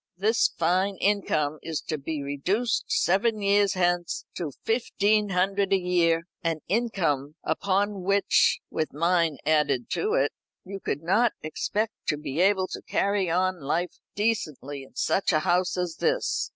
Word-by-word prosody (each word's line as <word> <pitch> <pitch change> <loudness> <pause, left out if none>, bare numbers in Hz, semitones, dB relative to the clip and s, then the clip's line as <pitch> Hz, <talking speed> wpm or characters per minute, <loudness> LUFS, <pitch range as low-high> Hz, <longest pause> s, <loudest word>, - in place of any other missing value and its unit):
"This 220 +5 +3
fine 185 +4 +1
income 155 -7 0
is 160 -2 -3
to 155 - -3
be 145 +1 -4
reduced 185 - -1
seven 215 +4 +2
years 200 0 +3
hence 175 -1 0
to 160 -5 -4
fifteen 215 -2 +1
hundred 195 +1 +1
a 195 - +5
year, 175 -2 +2 0.2
an 165 -2 -1
income 170 - 0
upon 200 +4 0
which 200 - +3
with 155 - -2
mine 165 -1 +1
added 145 -5 +1
to 425 +1 0
it - - +2 0.3
you 195 +1 -6
could 155 - -3
not 215 +7 +3
expect 210 +7 -2
to 150 - +1
be 145 0 -5
able 190 -1 +3
to - - -6
carry 200 -2 0
on 185 +1 +1
life 165 +6 -2 0.2
decently 155 - -2
in 135 - -15
such 195 - +1
a 155 -2 +2
house 180 0 +1
as 180 -2 -2
this. - - 0
180 Hz, 150 wpm, -26 LUFS, 160-200 Hz, 0.3 s, a